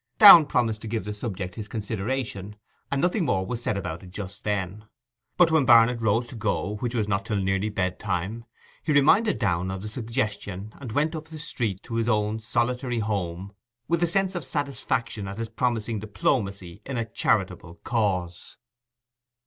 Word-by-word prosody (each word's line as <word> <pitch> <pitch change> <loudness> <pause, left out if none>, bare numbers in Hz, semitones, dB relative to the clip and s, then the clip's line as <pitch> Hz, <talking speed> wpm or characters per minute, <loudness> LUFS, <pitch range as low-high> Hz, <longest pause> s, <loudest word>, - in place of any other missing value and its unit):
Downe 175 -8 +11
promised 115 -5 0
to - - -7
give 110 -2 -2
the 105 - -3
subject 100 -4 -5
his 105 +1 -7
consideration, 105 -1 -3 0.3
and 140 - 0
nothing 180 +2 +2
more 95 - +1
was 120 +4 -4
said 105 -4 -1
about 90 -4 -4
it 95 - -12
just 95 +1 -8
then. 100 0 -2 0.5
But 175 -2 +5
when 160 -2 +4
Barnet 115 -1 +6
rose 110 +2 +2
to - - -9
go, 105 -1 -1
which 120 +2 -3
was 110 -3 0
not 100 -1 0
till 105 0 -2
nearly 95 +2 0
bedtime, 95 +2 -2 0.4
he 155 - 0
reminded 195 +10 +4
Downe 95 -4 0
of 95 0 -5
the - - -4
suggestion 110 -3 -3
and 130 -5 -7
went 150 +7 +1
up 155 0 -6
the 160 0 -9
street 115 - -3
to 115 -1 -4
his 115 +1 +1
own 105 -1 +1
solitary 120 +3 -1
home 100 -3 -3 0.3
with 170 0 +1
a 175 - +4
sense 190 +2 +1
of 175 - -3
satisfaction 130 - -2
at 95 +1 -6
his 115 -1 -4
promising 115 -1 -1
diplomacy 100 -3 -2
in 135 -2 -4
a 115 - -1
charitable 85 -5 -1
cause. 95 -7 -2
110 Hz, 180 wpm, -26 LUFS, 100-125 Hz, 0.5 s, Downe